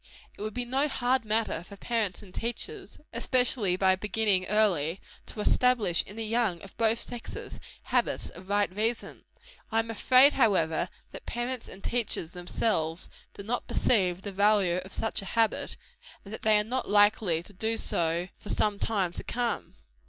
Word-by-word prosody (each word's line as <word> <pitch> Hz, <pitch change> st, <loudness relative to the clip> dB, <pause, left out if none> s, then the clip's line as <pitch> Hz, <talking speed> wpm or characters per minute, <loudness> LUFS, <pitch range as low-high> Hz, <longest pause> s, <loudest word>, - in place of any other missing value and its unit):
It -, -, -12 dB
would 215 Hz, 0 st, -4 dB
be 245 Hz, 0 st, -2 dB
no 265 Hz, +4 st, +1 dB
hard 250 Hz, -3 st, 0 dB
matter 215 Hz, -5 st, 0 dB
for 180 Hz, +4 st, -12 dB
parents 215 Hz, -3 st, -2 dB
and 185 Hz, -2 st, -15 dB
teachers 375 Hz, -, -4 dB, 0.2 s
especially 235 Hz, -5 st, +2 dB
by 190 Hz, 0 st, +3 dB
beginning 205 Hz, -1 st, +1 dB
early 190 Hz, -6 st, +2 dB, 0.3 s
to 210 Hz, -, -5 dB
establish 225 Hz, -7 st, +3 dB
in 205 Hz, -, -10 dB
the 225 Hz, 0 st, -3 dB
young 220 Hz, -5 st, +1 dB
of 195 Hz, -, -11 dB
both 225 Hz, 0 st, +2 dB
sexes, 240 Hz, -1 st, -5 dB, 0.2 s
habits -, -, 0 dB
of 185 Hz, +2 st, -13 dB
right 205 Hz, -2 st, +1 dB
reasoning. 225 Hz, +3 st, -2 dB, 0.5 s
I 225 Hz, -, 0 dB
am 225 Hz, 0 st, 0 dB
afraid, 255 Hz, +5 st, +6 dB
however, 180 Hz, -, +2 dB, 0.2 s
that -, -, -10 dB
parents 240 Hz, 0 st, -3 dB
and 195 Hz, -, -11 dB
teachers 220 Hz, -8 st, 0 dB
themselves 175 Hz, -2 st, -1 dB, 0.3 s
do 200 Hz, -, -8 dB
not 240 Hz, +4 st, -2 dB
perceive 185 Hz, -5 st, +1 dB
the 200 Hz, -, -4 dB
value 200 Hz, -2 st, +3 dB
of 185 Hz, +1 st, -6 dB
such 225 Hz, +1 st, 0 dB
a -, -, -8 dB
habit, 225 Hz, -1 st, +1 dB, 0.5 s
and 200 Hz, -, -9 dB
that -, -, -6 dB
they 215 Hz, -1 st, +4 dB
are 210 Hz, -, +2 dB
not 250 Hz, +4 st, -2 dB
likely 205 Hz, -5 st, +3 dB
to 205 Hz, -, -13 dB
do 220 Hz, +4 st, -1 dB
so 170 Hz, -3 st, 0 dB
for 205 Hz, -, -10 dB
some 205 Hz, -1 st, 0 dB
time 195 Hz, -6 st, 0 dB
to -, -, -6 dB
come. 240 Hz, -1 st, -3 dB
210 Hz, 175 wpm, -28 LUFS, 185-230 Hz, 0.5 s, afraid